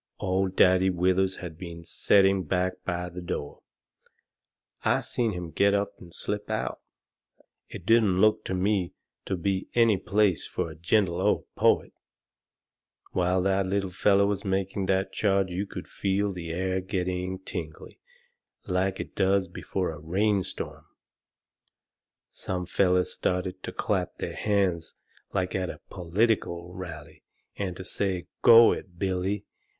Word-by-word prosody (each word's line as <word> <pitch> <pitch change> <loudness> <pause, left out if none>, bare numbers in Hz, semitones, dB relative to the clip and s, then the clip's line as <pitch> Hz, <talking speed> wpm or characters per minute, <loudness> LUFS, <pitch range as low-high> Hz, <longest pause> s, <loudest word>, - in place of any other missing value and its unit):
Old 95 0 0
Daddy 95 +1 +5
Withers 95 +1 +2
had 80 -3 -8
been 85 -2 -8
setting 95 +2 +3
back 90 +2 0
by 90 -1 -2
the 90 +1 -7
door. 75 -4 -5 1.2
I - - +2
seen 115 -3 -1
him 90 -2 -5
get 100 +3 +3
up 100 0 -1
and 85 - -13
slip 105 +4 -4
out. - - -2 0.9
It 90 - -9
didn't 110 -4 +4
look 110 +1 +4
to 95 - -2
me 95 -1 0 0.3
to 95 - -1
be 95 +2 -1
any 115 -4 +5
place 95 -2 +1
fur 80 - -3
a - - -10
gentle 85 +1 +1
old - - +2
poet. - - +2 1.2
While 90 0 +1
that 95 0 +1
little 95 0 -1
feller 100 +2 +3
was 100 -1 -1
making 95 0 -1
that 95 +1 +1
charge 95 -3 +1
you 95 +3 -2
could - - -7
feel 100 +1 0
the 90 -3 -6
air 95 +2 -1
getting 90 -1 -2
tingly, 85 -4 -7 0.7
like 95 0 0
it - - -6
does 95 0 +2
before 90 +1 -3
a 80 - -9
rain 95 +6 +1
storm. - - -6 1.4
Some 90 -1 -4
fellers 90 0 +2
started 90 0 -2
to - - -5
clap - - -1
their - - -4
hands 95 -5 0 0.4
like 95 -2 -1
at 95 -2 -1
a - - -7
political 90 -1 0
rally 85 -5 -9 0.3
and 95 -3 -3
to 95 - -6
say, 95 -4 -2 0.2
"Go 115 0 +9
it, 90 -2 -6
Billy!" 95 +2 -1
95 Hz, 145 wpm, -27 LUFS, 90-100 Hz, 1.4 s, Go